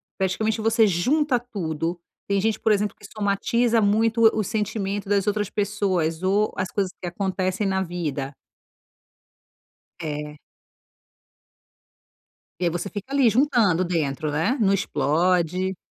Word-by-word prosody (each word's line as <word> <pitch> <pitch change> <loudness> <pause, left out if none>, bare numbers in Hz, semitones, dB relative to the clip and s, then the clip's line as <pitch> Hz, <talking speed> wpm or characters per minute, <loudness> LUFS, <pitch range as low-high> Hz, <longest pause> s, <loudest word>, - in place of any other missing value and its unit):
praticamente 215 +3 -1
você 225 0 +4
junta 250 - +2
tudo. 170 -7 -4 0.3
Tem 200 0 +2
gente, 220 +2 0
por 220 - +2
exemplo, 205 0 +1
que 210 - -15
somatiza 225 +3 +1
muito 225 +2 +4
o 215 - -1
sentimento 205 -1 -2
das 200 -1 +2
outras 210 -1 0
pessoas 190 -6 -1
ou 200 +3 +1
as 185 0 -2
coisas 195 -2 -1
que 180 - -4
acontecem 190 +2 -1
na 190 0 +1
vida. 150 -6 -3 1.7
É. 150 -1 -5 2.2
E - - 0
aí 170 - +2
você 175 +4 -3
fica 210 +6 -7
ali, 265 -5 +4
juntando 220 - +3
dentro, 155 -4 -1
né. 170 - +1
Não 195 -2 +3
explode. 180 +2 +1
195 Hz, 130 wpm, -24 LUFS, 175-215 Hz, 2.2 s, você